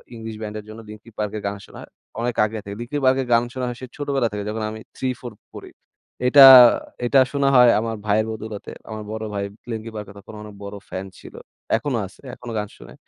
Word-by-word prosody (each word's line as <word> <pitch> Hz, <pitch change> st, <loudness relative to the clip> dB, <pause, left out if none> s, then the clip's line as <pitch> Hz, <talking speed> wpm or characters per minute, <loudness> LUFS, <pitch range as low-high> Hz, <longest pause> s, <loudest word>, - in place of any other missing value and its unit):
English 115 Hz, -1 st, -7 dB
ব্যান্ডের 105 Hz, 0 st, -6 dB
জন্য 110 Hz, +1 st, -10 dB
Linking 105 Hz, +2 st, -13 dB
Park 105 Hz, -1 st, -2 dB
এর -, -, -6 dB
গান 100 Hz, 0 st, -3 dB
শোনা -, -, -14 dB
হয়। -, -, -13 dB, 0.3 s
অনেক 120 Hz, 0 st, -1 dB
আগে 110 Hz, +1 st, -5 dB
থেকে। 100 Hz, 0 st, -7 dB
Linking 140 Hz, +5 st, -4 dB
Park 130 Hz, 0 st, +4 dB
এর 130 Hz, -, -5 dB
গান 115 Hz, 0 st, +4 dB
শোনা 130 Hz, -2 st, -3 dB
হয় 120 Hz, -1 st, -5 dB
সে -, -, -5 dB
ছোটবেলা 140 Hz, -4 st, 0 dB
থেকে 105 Hz, 0 st, -4 dB
যখন 110 Hz, +1 st, -3 dB
আমি 110 Hz, -, -8 dB, 0.2 s
3, 130 Hz, -1 st, -2 dB
4 120 Hz, -, -7 dB, 0.2 s
পড়ি। -, -, -10 dB, 0.6 s
এটা 135 Hz, +2 st, +9 dB, 0.6 s
এটা 135 Hz, +3 st, +4 dB
শোনা 140 Hz, -1 st, +1 dB
হয় 125 Hz, -1 st, +8 dB
আমার 115 Hz, 0 st, -3 dB
ভাইয়ের 110 Hz, +1 st, +2 dB
বদৌলতে। 110 Hz, -1 st, -7 dB, 0.2 s
আমার 110 Hz, -1 st, -6 dB
বড় 110 Hz, 0 st, -5 dB
ভাই 100 Hz, -1 st, -2 dB, 0.3 s
Linking 110 Hz, 0 st, -6 dB
Park 105 Hz, -1 st, -5 dB
এর 100 Hz, -, -13 dB
তখন 100 Hz, -, -13 dB
অনেক 105 Hz, -1 st, -11 dB
বড় 100 Hz, 0 st, -7 dB
ফ্যান 95 Hz, +1 st, -5 dB
ছিল। -, -, -13 dB, 0.4 s
এখনো 120 Hz, +2 st, -2 dB
আছে। 95 Hz, -, -20 dB
এখনো 120 Hz, -1 st, -9 dB
গান 105 Hz, -, -3 dB
শোনে। -, -, -13 dB
110 Hz, 225 wpm, -22 LUFS, 105-125 Hz, 0.6 s, এটা